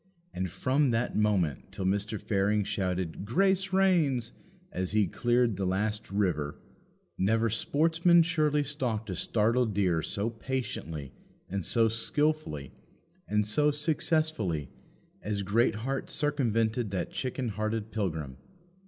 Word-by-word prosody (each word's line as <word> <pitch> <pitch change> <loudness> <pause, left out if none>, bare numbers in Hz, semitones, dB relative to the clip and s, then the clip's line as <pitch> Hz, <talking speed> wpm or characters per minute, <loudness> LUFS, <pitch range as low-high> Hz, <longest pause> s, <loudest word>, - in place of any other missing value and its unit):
And 95 0 -2
from 130 - +1
that 115 +1 0
moment 100 - +1
till 95 - -4
Mr. 100 +3 0
Fearing 105 +1 +1
shouted 95 -4 -2
"Grace 190 - +1
reigns!" 160 -11 +2 0.4
as 95 +1 -2
he 105 -1 +4
cleared 120 +2 +1
the 95 - -1
last 105 +3 -1
river, 90 -8 -1 0.6
never 110 +3 +2
sportsman 165 - +3
surely 155 -3 +1
stalked 120 -7 -3
a - - -3
startled 115 +3 +1
deer 90 -5 +2
so 105 +6 -2
patiently 105 - -4 0.3
and 95 0 -3
so 115 +7 +3
skilfully 115 - 0 0.6
and 105 0 +1
so 145 +8 +2
successfully 150 - 0 0.5
as 100 -1 -2
Greatheart 115 +5 0
circumvented 120 -6 0
that 95 -2 -3
chicken 130 -1 -3
hearted 110 +1 -3
pilgrim. 80 - -3
110 Hz, 120 wpm, -29 LUFS, 95-135 Hz, 0.6 s, he